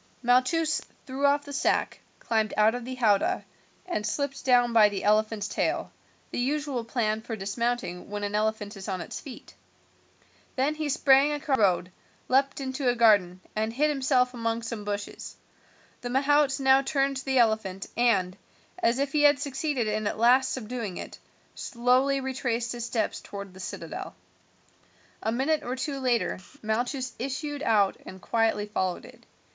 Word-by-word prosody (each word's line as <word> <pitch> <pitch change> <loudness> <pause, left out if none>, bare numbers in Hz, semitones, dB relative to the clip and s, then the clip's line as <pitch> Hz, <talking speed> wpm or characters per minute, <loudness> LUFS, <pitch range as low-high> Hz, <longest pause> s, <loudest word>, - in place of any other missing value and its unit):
Malchus 300 +6 +2 0.2
threw 275 +1 0
off 285 +1 +2
the 285 - -8
sack, 270 - 0 0.2
climbed 220 -1 -1
out 215 +1 +5
of 245 -1 -5
the 255 +1 -5
howdah, 215 -5 +2 0.4
and 350 -12 -2
slipped 275 +5 -2
down 245 -2 +4
by 215 -2 +7
the 200 -2 -4
elephant's 215 0 +2
tail, - - -1 0.4
the - - -3
usual 275 -1 -1
plan 220 -2 -1
for 225 0 -5
dismounting 205 -1 -3
when 205 0 -4
an 205 0 -2
elephant 215 0 -1
is 195 -1 -8
on 190 -2 -2
its - - -6
feet. 270 -6 -11 1.0
Then 275 +3 +1
he 305 -1 -3
sprang 275 +1 +4
across 290 -1 0
the - - 0
road, 185 -2 +2 0.4
leaped 270 +2 +2
into 260 -1 -1
a 245 - +1
garden, 205 -6 +4
and 220 +1 0
hid 300 +5 +2
himself 260 -2 +2
among 230 -1 -2
some 225 -2 -5
bushes. 205 0 -5 0.7
The 245 - -4
mahout 280 +2 +3
now 265 0 +5
turned 275 -1 0
the 265 0 -1
elephant, 220 -5 +1
and, 200 -7 +2 0.4
as 235 -7 +2
if 280 0 -1
he 300 -1 +2
had 290 -1 +6
succeeded 280 -3 -2
at 215 0 -1
last 255 +4 +4
in 255 - -5
subduing 220 -4 -5
it, - - -8 0.3
slowly 255 +3 +1
retraced 245 -3 -2
his 240 -1 -4
steps 235 -2 -1
towards 200 -2 -8
the 190 - -13
citadel. 185 - -6 1.1
A 220 - -1
minute 275 +6 +1
or 250 - -4
two 275 +2 -3
later 245 -7 0 0.2
Malchus 245 +4 -2
issued 280 +3 -4
out 210 -7 +2
and 190 - -10
quietly 225 0 +1
followed 185 -4 -2
it. - - -16
245 Hz, 165 wpm, -27 LUFS, 215-270 Hz, 1.1 s, by